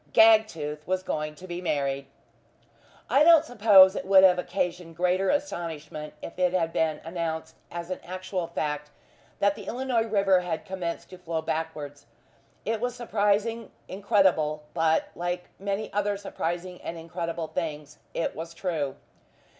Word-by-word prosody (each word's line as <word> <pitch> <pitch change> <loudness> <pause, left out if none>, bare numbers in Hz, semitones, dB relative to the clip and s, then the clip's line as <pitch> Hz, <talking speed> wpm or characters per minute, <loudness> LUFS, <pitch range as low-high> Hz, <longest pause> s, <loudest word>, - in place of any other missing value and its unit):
Gagtooth 165 -10 +4
was 185 0 0
going 155 -3 -3
to 180 - -11
be 175 -1 -5
married! 140 -5 -1 1.0
I 285 - +5
don't 325 -1 +7
suppose 205 -6 +7
it - - -3
would 190 0 +6
have 180 -1 +6
occasioned 175 -2 -3
greater 180 +2 +2
astonishment 160 - -3
if 170 - -8
it 180 0 +2
had 165 -3 0
been 155 -2 +1
announced 165 -1 -4 0.2
as 170 +1 -6
an 185 - -3
actual 185 -1 -4
fact 150 -3 -3 0.5
that 200 0 +3
The - - -10
Illinois 245 -2 0
river 195 -3 +3
had 170 -3 -4
commenced 180 -3 -5
to 185 - -10
flow 165 -2 -3
backwards. 150 -4 -4 0.6
It 220 +1 -1
was 245 0 -1
surprising, 220 0 0 0.2
incredible, 185 -6 +2
but, 160 -1 +2
like 175 +1 -3
many 200 +2 -3
other 205 0 0
surprising 180 -2 -4
and 170 - -5
incredible 165 0 -4
things, 150 -4 -5 0.2
it 165 - -1
was 165 +1 -7
true. 155 -8 -2
180 Hz, 145 wpm, -27 LUFS, 160-200 Hz, 1.0 s, don't